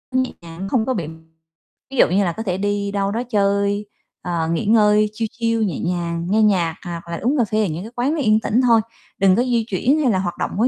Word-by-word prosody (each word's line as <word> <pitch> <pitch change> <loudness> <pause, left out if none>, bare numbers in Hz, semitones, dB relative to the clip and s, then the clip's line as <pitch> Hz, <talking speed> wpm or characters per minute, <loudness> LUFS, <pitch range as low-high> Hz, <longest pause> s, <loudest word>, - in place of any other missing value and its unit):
nhẹ 260 0 +1
nhàng 170 +3 -7
không 225 -4 +1
có 260 - 0
bị 170 -9 -3 0.8
ví 270 - -6
dụ - - +6
như 195 +3 +2
là 170 - -1
có 225 - -3
thể 185 -3 -2
đi 205 0 -1
đâu 200 0 -1
đó 235 +3 -2
chơi, 200 -1 +1 0.4
ờ, 170 -2 -2
nghỉ 165 - -1
ngơi 210 -1 +4
chill 225 0 -2
chill 230 -1 0
nhẹ 180 -8 -2
nhàng, 170 -1 -2
nghe 215 +2 +3
nhạc 175 -6 +2
hoặc 170 -1 -6
là 170 - -3
uống 275 +5 +1
cà 235 - +3
phê 215 +2 0
ở - - -1
những 165 +4 -4
cái 225 - -9
quán 255 +5 0
nó 320 - -2
yên 215 -2 +3
tĩnh 235 +3 +1
thôi, 230 -2 +5 0.4
đừng 190 -1 +4
có 245 - +2
di 235 -3 0
chuyển 255 - +1
hay 260 -6 +2
là 190 - +1
hoạt 175 -2 -3
động - - -2
quá 235 +4 +3
205 Hz, 260 wpm, -20 LUFS, 180-230 Hz, 0.8 s, dụ